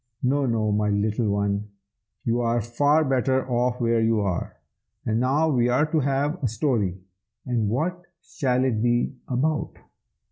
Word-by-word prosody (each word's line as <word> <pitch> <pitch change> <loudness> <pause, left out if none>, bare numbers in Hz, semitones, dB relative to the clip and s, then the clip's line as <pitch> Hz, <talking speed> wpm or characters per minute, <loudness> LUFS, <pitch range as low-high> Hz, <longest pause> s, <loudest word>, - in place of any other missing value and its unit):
No, 135 +2 +2
no, 110 -3 0
my 105 0 +1
little 105 +2 0
one! 100 +1 -1 0.6
you 120 +1 +1
are 120 0 +1
far 145 +7 +2
better 130 0 +1
off 125 0 0
where 115 -1 +2
you 110 -1 +2
are. 95 -4 -2 0.5
But 110 0 0
now 140 +6 +2
we 125 -4 +2
are 125 +5 +3
to 160 - +2
have 140 +5 0
a - - +3
story, 110 - -1 0.5
and 120 -5 0
what 170 - -1 0.2
shall 130 -6 -1
it 120 -5 0
be 120 +2 +1
about?" 150 +5 -1
120 Hz, 155 wpm, -24 LUFS, 110-135 Hz, 0.6 s, are